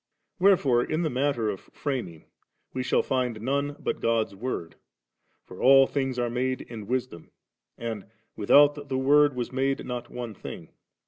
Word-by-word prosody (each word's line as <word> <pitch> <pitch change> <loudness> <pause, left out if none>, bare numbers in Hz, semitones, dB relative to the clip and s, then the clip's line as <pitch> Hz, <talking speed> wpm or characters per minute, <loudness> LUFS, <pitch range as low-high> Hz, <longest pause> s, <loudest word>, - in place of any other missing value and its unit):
Where 195 +1 +6
fore, 125 -5 +2
in 155 +5 -1
the 155 - -1
matter 125 -4 0
of 95 - -6
fiuming, 120 - -4 0.5
we 130 - -2
shall 125 - +1
find 125 -4 -1
none 140 +5 -1
but - - -3
God's 115 -2 +1
Word; 100 -5 -4 0.7
for 90 - -11
'all 135 0 +7
things 135 -2 -2
aie 120 -1 0
made 130 +2 -1
in 110 -4 -9
Wisdom,' 125 -9 -3 0.5
and 115 -4 -5 0.3
'without 145 +8 +6 0.2
the 130 - -1
Woid 145 +1 +4
was 125 -1 -3
made 135 +2 -1
not 125 -1 -5
one 120 -3 -6
thing.' - - -9
130 Hz, 165 wpm, -26 LUFS, 115-135 Hz, 0.7 s, all